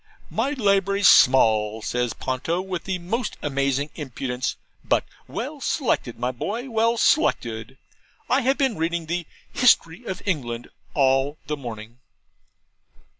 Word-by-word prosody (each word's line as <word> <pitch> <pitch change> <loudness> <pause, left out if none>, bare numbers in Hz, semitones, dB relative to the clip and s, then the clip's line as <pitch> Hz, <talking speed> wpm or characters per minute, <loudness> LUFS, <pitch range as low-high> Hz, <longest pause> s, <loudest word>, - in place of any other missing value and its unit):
'My 255 +6 0
library's 200 -5 +3
small, 110 -4 +5
says 120 -2 -1
Ponto, 130 +9 -2
with 185 -2 -4
the 190 -1 -1
most 215 +7 -3
amazing 140 0 0
impudence, 130 -3 -3 0.3
'but - - +1 0.2
well - - -5
selected, - - 0
my 125 +1 -1
boy 225 - -4
well 230 +1 +2
selected. 120 - +1 0.5
I 265 - +3
have 265 +2 +2
been 265 -5 +1
reading 165 0 -1
the 170 0 -3 0.3
"History 210 -5 +3
of 190 - -5
England" 125 - -2 0.3
all 135 +1 +2
the 150 +2 -2
morning.' 115 -3 -8
155 Hz, 125 wpm, -24 LUFS, 125-200 Hz, 0.5 s, small